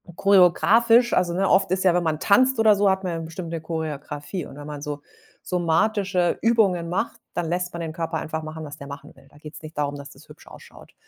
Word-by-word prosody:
choreografisch. 225 +6 +4
Also, 175 -1 +1
ne, 190 +2 0
oft 190 0 +3
ist 185 0 0
ja 180 - +5
wenn 180 - +2
man 155 -2 -1
tanzt 255 +5 +3
oder 220 -2 +5
so, 200 0 +3
hat 190 0 0
man 180 - -2
ja 165 - -3
bestimmt 165 +1 -7
'ne 165 - -3
Choreografie 155 +1 -5
und - - -12
wenn 145 - -9
man 145 -1 -7
so 145 0 -5 0.4
somatische 180 +1 0
Übungen 205 -7 +2
macht, 190 +7 -2
dann 175 - -2
lässt 180 +1 -2
man 170 - -6
den 165 -1 -4
Körper 165 0 -3
einfach 160 0 -4
machen, 155 0 -7
was 145 0 -9
der 140 - -10
machen 140 +1 -10
will. 135 0 -20
Da - - -24
geht's 150 +1 -11
nicht 155 0 -11
darum, 145 -1 -1
dass 140 0 -9
das - - -17
hübsch - - -16
ausschaut. - - -15
170 Hz, 235 wpm, -23 LUFS, 155-195 Hz, 0.4 s, ja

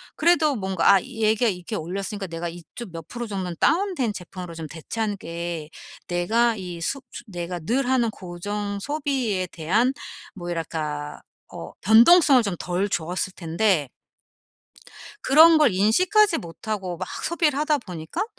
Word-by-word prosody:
그래도 315 -4 +3
뭔가 190 -2 +3
아 190 - +3
얘가 225 -2 +1
이렇게 185 +2 -3
올렸으니까 195 +4 -4
내가 170 0 -4
이쪽 175 +5 -10
몇 165 -1 -8
프로 240 0 -5
정도는 185 -4 -4
다운된 335 - +1
제품으로 180 -2 -8
좀 160 -1 -6
대체하는 205 +6 -4
게 170 -2 -5 0.4
내가 220 +7 +1
이 180 -3 -6
수 275 +11 -2
수 240 - -9
내가 175 -2 -5
늘 245 +10 -1
하는 245 -3 +2
고정 200 +3 -5
소비에 265 -10 -1
대한 200 +11 +1 0.4
뭐 175 -2 -7
이랄까 150 -3 -4 0.3
어 80 - -8
변동성을 250 - +7
좀 200 -4 -2
덜 185 +3 -1
줬을 180 +2 -2
텐데 165 -3 0 1.3
그런 320 +3 +7
걸 290 -9 +4
인식하지 370 - +3
못하고 180 +2 -5
막 - - -5 0.2
소비를 320 -5 +1
하다 300 -1 +2
보니까 175 - -5
200 Hz, 295 characters per minute, -24 LUFS, 175-245 Hz, 1.3 s, 변동성을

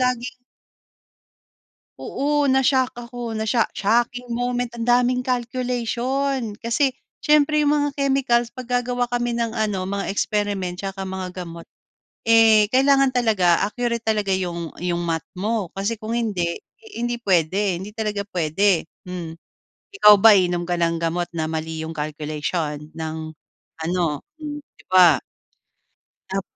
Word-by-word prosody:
laging 250 0 0 1.6
Oo, 290 +1 0
na-shock 265 -1 +3 0.2
ako, 240 -2 -5
na-sho 220 +1 +1
shocking 240 +4 0
moment. 245 +1 -1
Ang 230 - -3
daming 250 +1 +2
calculation 250 0 -1
kasi 250 +4 +1 0.3
siyempre 300 0 +4
yung 290 - +3
mga 290 -1 +2
chemicals, 265 -4 +1
‘pag 255 -2 -9
gagawa 245 0 0
kami 240 0 -1
ng 235 -1 -2
ano, 200 -4 -1
mga 200 0 -2
experiment 200 -4 -1
'tsaka 195 0 -5
mga 185 -1 -5
gamot, 170 0 -9 0.6
eh, 225 -2 +6
kailangan 270 +1 +3
talaga 200 -8 +3
accurate 235 +2 -2
talaga 210 -3 +1
yung 170 -3 -4
yung 175 -1 0
Math 165 -1 -1 0.2
mo. 210 -3 -1
Kasi 200 +4 -2
kung 220 +1 -7
hindi, 200 -8 -1 0.4
hindi 240 0 -1
puwede, 190 -2 +1
hindi 210 +3 -9
talaga 210 -2 -3
puwede. 180 +1 +1 0.2
Mm. 170 -2 -6 0.6
Ikaw 210 0 +10
ba, 220 +2 +7
iinom 175 -3 +2
ka 175 0 -2
ng 165 0 +1
gamot 170 +1 -1
na 160 - 0
mali 160 0 -4
yung 160 - -5
calculation 150 0 -3
ng 160 0 -4 0.7
ano, 170 -4 -1 0.2
hmm, 295 -1 -6 0.2
‘di - - -20
ba? 180 -5 +6 1.1
Tap 195 0 -2
215 Hz, 135 wpm, -22 LUFS, 180-245 Hz, 1.6 s, Ikaw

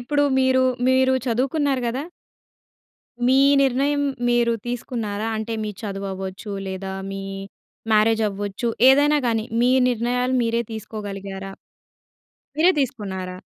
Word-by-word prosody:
ఇప్పుడు 290 +4 0 0.2
మీరు, 260 0 +3 0.3
మీరు 260 0 +3 0.2
చదువుకున్నారు 270 +3 0
కదా!... 260 +5 -3 1.2
మీ 260 +1 +4 0.3
నిర్ణయం 275 +2 +1 0.3
మీరు 240 -1 +3
తీసుకున్నారా? 225 -3 -3
అంటే 220 +1 -4
మీ 210 - -3
చదువవ్వచ్చు 195 0 -5
లేదా, 190 0 -5 0.2
మీ 195 0 -5 0.7
మ్యారేజ్ 220 +1 +3
అవ్వచ్చు 205 +3 -3 0.2
ఏదైనా 290 +2 +5
కానీ, 225 -2 0 0.2
మీ 245 - +4 0.2
నిర్ణయాలు 250 +2 0
మీరే 230 0 0
తీసుకోగలిగారా? 195 -3 -6 1.1
మీరే 340 +4 +6
తీసుకున్నారా? 190 -7 -3
230 Hz, 105 wpm, -22 LUFS, 200-260 Hz, 1.2 s, మీరే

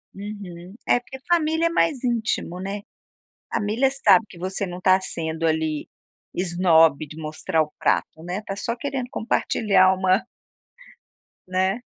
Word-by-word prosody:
Uhum. 195 -3 -8
É 245 - +4
porque 265 +2 -11
família 325 -1 +2
é - - 0
mais 305 -6 +1
íntimo, 225 -7 -1
né, 200 +2 -4 0.7
família 230 +5 +1
sabe 270 -5 +4
que 175 - -13
você 190 +2 -2
não 180 0 -6
tá 185 +1 +4
sendo 165 -2 -2
ali 155 -1 -1 0.5
esnobe 165 -4 +3
de 150 - -11
mostrar 155 0 -1
o 150 - -7
prato, 160 - 0
né, 180 +5 -4
tá 195 - -5
só 230 +4 -3
querendo 265 -2 -3
compartilhar 200 -4 +2
uma 190 +2 +2 1.3
Né. 190 +5 0
190 Hz, 140 wpm, -23 LUFS, 170-230 Hz, 1.3 s, É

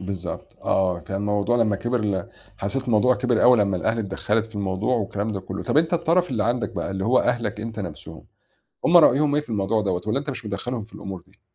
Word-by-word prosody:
بالضبط. 95 -1 -6
آه، 90 -2 +1
كان 95 +3 -5
الموضوع 105 +3 +1
لمّا 110 -4 +2
كِبِر 120 +4 -1
ل 100 -2 -1 0.3
حسّيت 130 +7 -2
الموضوع 120 +2 +3
كِبِر 125 -3 +1
أوي 125 0 +7
لمّا 100 -2 +2
الأهل 110 +6 0
اتدخَّلت 105 +2 -1
في 110 - -19
الموضوع 100 +5 0
والكلام 105 0 -2
ده 100 - -3
كُلّه. 95 +1 -6
طَب - - -1
أنت 165 +2 +3
الطَرَف 170 0 +2
اللي 110 -4 0
عندك 120 -2 0
بقى - - -3
اللي 95 0 -3
هو 125 +3 +4
أهلك 115 -4 0
أنت 110 -1 -6
نَفْسهم، 90 - -8 0.6
هم 175 +1 +5
رأيهم 145 -2 +5
إيه 150 - +2
في - - -19
الموضوع 105 0 0
دوّة؟ 90 -3 -1
والّا 110 +6 +1
أنت 145 0 -4
مش 120 -3 -7
مدخَّلهم 110 +3 -4
في 110 - -19
الأمور 95 -3 -7
دي؟ 95 +2 -29
110 Hz, 225 wpm, -23 LUFS, 100-125 Hz, 0.6 s, أوي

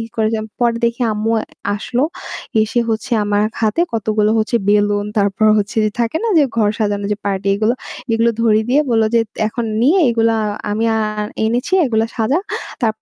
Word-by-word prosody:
কইরাম 220 -1 -1
পরে 235 -1 +2
দেখি 235 +2 0
আম্মু 215 +1 -1
আ - - -4 0.3
আসলো। 245 +5 -1 0.6
এসে 225 +3 0
হচ্ছে 225 +1 -2
আমার 205 0 +1 0.2
হাতে 215 +8 +1
কতগুলো 215 -1 +1
হচ্ছে 220 +2 +1
বেলুন, 205 0 +2
তারপর 200 +1 +1
হচ্ছে 205 +2 -3
যে 215 - +1
থাকে 235 +5 0
না 460 - +1
যে 295 - +5
ঘর 215 -2 +3
সাজানো 205 -2 -1
যে - - -1
পার্টি 195 0 -1
এগুলো; 215 +4 +1 0.4
এগুলো 230 +1 +3
ধরিয়ে 220 -1 +3
দিয়ে 270 +4 +4
বলল 225 -1 +3
যে 230 - +5 0.3
এখন 235 +2 -3 0.2
নিয়ে 315 +10 +4
এগুলা 225 -1 +2 0.3
আমি 220 +2 0
আর 215 -1 -2 0.2
এনেছি 240 +9 -1
এগুলো 225 -3 +1
সাজা। 240 +7 +1 0.4
তাপ 230 -4 +2
220 Hz, 175 wpm, -17 LUFS, 210-235 Hz, 0.6 s, যে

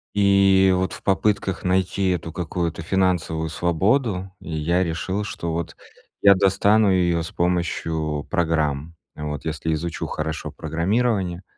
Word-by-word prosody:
И 95 -1 +5
вот 95 +1 0
в - - -9
попытках 95 0 0
найти 95 +1 +1
эту 85 -3 -2
какую-то 85 -1 -3
финансовую 85 -3 0
свободу, 95 - 0
я 85 +3 0
решил, 95 +4 -2
что 85 -5 -4
вот 85 0 -4 0.4
я 100 0 +7
достану 100 +2 +3
её 85 -3 +2
с 80 - -7
помощью 80 -4 -1
программ, 80 -4 0 0.2
вот, 75 -1 -5
если 80 0 -2
изучу 85 +2 -3
хорошо 80 0 -4
программирование, 95 0 -1
90 Hz, 125 wpm, -23 LUFS, 80-95 Hz, 0.4 s, я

